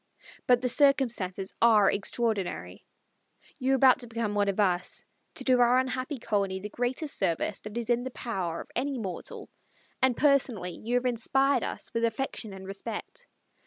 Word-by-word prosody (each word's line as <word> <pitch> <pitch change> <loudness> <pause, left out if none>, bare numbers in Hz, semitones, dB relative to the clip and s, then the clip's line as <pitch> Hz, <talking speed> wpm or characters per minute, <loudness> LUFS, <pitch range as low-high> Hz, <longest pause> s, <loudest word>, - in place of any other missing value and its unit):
But 245 -1 +5
the 255 - 0
circumstances 240 -9 +2
are 215 -4 +6
extraordinary. 210 -2 -2 0.8
You 265 0 +1
are - - +5
about 260 -1 +5
to 245 - -6
become 230 -2 -2
one 205 -1 +1
of 195 - -2
us, 180 -3 0 0.3
to - - -3
do 255 -2 +3
our 245 +1 +5
unhappy 260 +2 -1
colony 200 -5 -1
the 210 +2 -6
greatest 250 +7 -2
service 170 +4 -1
that 210 +2 -7
is 235 -2 -3
in 240 0 +1
the 260 - -4
power 190 -10 -4
of - - -13
any 275 +2 -1
mortal, 195 -6 -6 0.5
and 260 -2 +3
personally 260 -10 +2
you 230 +7 -4
have 245 +1 +1
inspired 260 +2 +2
us - - -5
with 230 - -1
affection 230 -1 -2
and 190 0 -9
respect. 195 +1 -6
235 Hz, 170 wpm, -28 LUFS, 200-255 Hz, 0.8 s, are